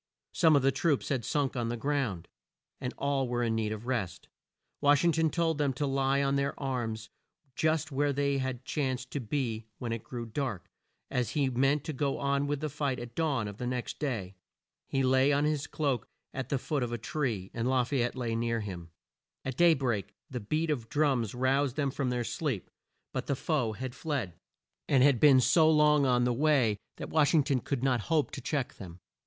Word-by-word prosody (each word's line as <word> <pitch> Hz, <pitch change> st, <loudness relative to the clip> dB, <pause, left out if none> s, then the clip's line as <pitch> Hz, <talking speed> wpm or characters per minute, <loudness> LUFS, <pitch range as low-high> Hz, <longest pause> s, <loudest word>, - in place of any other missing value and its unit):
Some 160 Hz, -3 st, +5 dB
of 140 Hz, -, +3 dB
the 135 Hz, -, +4 dB
troops 150 Hz, -1 st, 0 dB
had 130 Hz, -4 st, 0 dB
sunk 140 Hz, +3 st, 0 dB
on 120 Hz, -2 st, -1 dB
the 120 Hz, -, -2 dB
ground, 125 Hz, -, -1 dB, 0.5 s
and 125 Hz, -, -3 dB
all 140 Hz, -2 st, 0 dB
were 120 Hz, 0 st, -1 dB
in 115 Hz, -1 st, +1 dB
need 110 Hz, -1 st, -1 dB
of 110 Hz, +1 st, -5 dB
rest. 120 Hz, -8 st, -3 dB, 0.5 s
Wash 145 Hz, +1 st, +4 dB
ing 170 Hz, -, +5 dB
ton 160 Hz, 0 st, +2 dB
told 165 Hz, -2 st, 0 dB
them 140 Hz, -2 st, +1 dB
to 145 Hz, +3 st, -2 dB
lie 135 Hz, 0 st, +1 dB
on 140 Hz, 0 st, +1 dB
their 140 Hz, 0 st, -1 dB
arms 120 Hz, -5 st, -3 dB, 0.4 s
just 160 Hz, 0 st, +1 dB
where 145 Hz, +1 st, +1 dB
they 140 Hz, 0 st, 0 dB, 0.3 s
chanced 130 Hz, -4 st, -2 dB
to 145 Hz, -, -2 dB
be 115 Hz, -3 st, -2 dB
when 120 Hz, -2 st, -4 dB
it 115 Hz, -1 st, -3 dB
grew 120 Hz, -2 st, -6 dB
dark, 115 Hz, -5 st, -4 dB, 0.4 s
as 125 Hz, -2 st, 0 dB
he 135 Hz, -3 st, +2 dB
meant 135 Hz, +3 st, +2 dB
to 160 Hz, -, -4 dB
go 140 Hz, 0 st, -1 dB
on 140 Hz, 0 st, 0 dB
with 145 Hz, 0 st, -2 dB
the 155 Hz, -, -1 dB
fight 140 Hz, -2 st, -1 dB
at 120 Hz, -1 st, -8 dB
dawn 140 Hz, -7 st, 0 dB
of 100 Hz, -1 st, -7 dB
the 125 Hz, -, -3 dB
next 125 Hz, -1 st, -3 dB
day. 115 Hz, -11 st, -3 dB, 0.5 s
He 135 Hz, -1 st, 0 dB
lay 130 Hz, +2 st, +4 dB
on 145 Hz, +1 st, +2 dB
his 150 Hz, -1 st, 0 dB
cloak 140 Hz, -7 st, -1 dB, 0.3 s
at 130 Hz, -1 st, -4 dB
the 140 Hz, -, +1 dB
foot 145 Hz, +2 st, -2 dB
of 120 Hz, -1 st, -2 dB
a 120 Hz, -, -2 dB
tree, 115 Hz, -6 st, -3 dB
and 115 Hz, +1 st, -1 dB
La 130 Hz, -1 st, +3 dB
fay 125 Hz, +1 st, 0 dB
ette 120 Hz, +2 st, -1 dB
lay 120 Hz, -3 st, -2 dB
near 115 Hz, 0 st, 0 dB
him. 90 Hz, -5 st, -7 dB, 0.6 s
At 130 Hz, -1 st, -3 dB
day 170 Hz, +1 st, +6 dB
break 120 Hz, -8 st, -2 dB, 0.2 s
the 125 Hz, -, -3 dB
beat 155 Hz, +9 st, -1 dB
of 120 Hz, -6 st, -3 dB
drums 135 Hz, -7 st, +1 dB
roused 130 Hz, +1 st, +1 dB
them 140 Hz, -3 st, 0 dB
from 130 Hz, -1 st, -1 dB
their 125 Hz, -1 st, -1 dB
sleep, 130 Hz, -, -3 dB, 0.4 s
but -, -, -3 dB
the 140 Hz, -, +1 dB
foe 130 Hz, -6 st, 0 dB
had 125 Hz, +3 st, -5 dB
fled, 135 Hz, -, -3 dB, 0.6 s
and 135 Hz, -3 st, +5 dB
had 140 Hz, -4 st, +5 dB
been 140 Hz, -3 st, +7 dB
so 155 Hz, +5 st, +5 dB
long 150 Hz, -2 st, +5 dB
on 125 Hz, -1 st, +3 dB
the 125 Hz, 0 st, +2 dB
way 125 Hz, -6 st, +2 dB, 0.2 s
that -, -, -7 dB
Wash 155 Hz, +1 st, +3 dB
ing 150 Hz, -, +5 dB
ton 135 Hz, -2 st, +1 dB
could 130 Hz, 0 st, -3 dB
not 130 Hz, -3 st, +2 dB
hope 155 Hz, -3 st, +2 dB
to 135 Hz, -, -6 dB
check 135 Hz, 0 st, -2 dB
them. 90 Hz, -2 st, -10 dB
135 Hz, 215 wpm, -30 LUFS, 120-145 Hz, 0.6 s, been